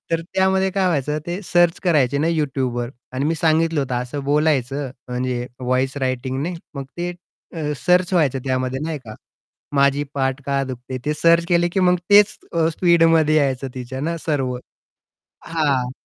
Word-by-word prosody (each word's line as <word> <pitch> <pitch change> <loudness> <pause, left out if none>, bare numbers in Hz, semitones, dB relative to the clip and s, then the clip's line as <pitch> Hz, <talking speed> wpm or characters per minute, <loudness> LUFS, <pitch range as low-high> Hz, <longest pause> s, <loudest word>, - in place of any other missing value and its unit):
तर 165 0 +1
त्यामध्ये 190 0 +2
काय 195 0 +1
व्हायचं 150 -3 0
ते 175 +3 -3
सर्च 175 -1 +3
करायचे 140 -6 +2
ना 155 - +1
YouTubeवर 130 -6 -1 0.2
आणि 130 +2 -2
मी 160 +2 +1
सांगितलं 160 0 +2
होतं 130 -2 -2
असं 135 +3 -6
बोलायचं 140 -2 +1 0.2
म्हणजे 125 0 -2
व्हॉईस 130 +2 0
रायटिंगने. 130 +5 -2 0.2
मग 140 -1 -5
ते 175 0 -2 0.4
अ, 150 -2 -2
सर्च 180 +1 +3
व्हायचं 145 -7 +2
त्यामध्ये 130 0 -1
नाही 160 -2 -3
का. 110 - -9 0.6
"माझी 140 0 +3
पाठ 135 0 -1
का 140 -1 +1
दुखते?" 130 0 -6
ते 150 - 0
सर्च 170 +2 +4
केले 175 0 +3
की 190 +3 -1
मग 180 -1 +4
तेच 205 0 +6 0.2
अ, 165 -1 +2
स्पीडमध्ये 165 -2 +4
यायचं 135 -2 +1
तिच्या 130 +1 -6
ना 165 +3 -2
सर्व. 135 -5 0 0.9
हां. 140 -6 0
145 Hz, 160 wpm, -21 LUFS, 130-165 Hz, 0.9 s, तेच